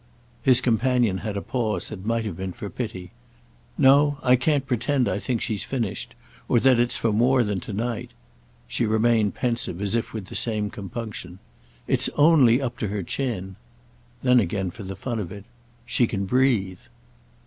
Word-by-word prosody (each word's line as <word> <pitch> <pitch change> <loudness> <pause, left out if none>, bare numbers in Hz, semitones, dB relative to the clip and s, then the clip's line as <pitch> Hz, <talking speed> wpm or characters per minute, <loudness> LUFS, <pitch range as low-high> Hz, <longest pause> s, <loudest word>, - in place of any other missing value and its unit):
His 130 -1 +4
companion 120 -4 +2
had 105 -3 -4
a - - -4
pause 115 -4 -2
that 100 -3 -8
might 115 0 0
have 100 -6 -4
been 95 +1 -5
for 100 - -7
pity. 95 -7 -6 0.7
"No, 145 +2 +5
I 125 -1 +5
can't 140 +2 +1
pretend 125 +1 0
I - - -1
think 120 +1 -2
she's 110 -4 -2
finished—or 120 0 -3
that 130 0 +4
it's 120 0 +3
for 115 - 0
more 125 +3 +3
than 105 -3 -2
to 110 - -8
night." 115 +3 -3 0.6
She 115 - -1
remained 110 -1 +2
pensive 115 -8 -1
as 100 0 -1
if 115 -1 0
with 110 -4 -6
the - - -10
same 105 -3 -1
compunction. 100 -3 -7 0.5
"It's - - +1
only 145 -6 +5
up 120 -4 -4
to 110 - -1
her 100 -1 -3
chin." 95 -5 -3 0.7
Then 125 -1 +5
again 95 -2 -1
for 115 - -11
the 95 -1 -6
fun 115 +4 -4
of 90 -5 -5
it: 100 -1 -9 0.4
"She 120 0 +2
can 100 -3 -2
breathe." 105 -5 +1
115 Hz, 175 wpm, -24 LUFS, 100-125 Hz, 0.7 s, No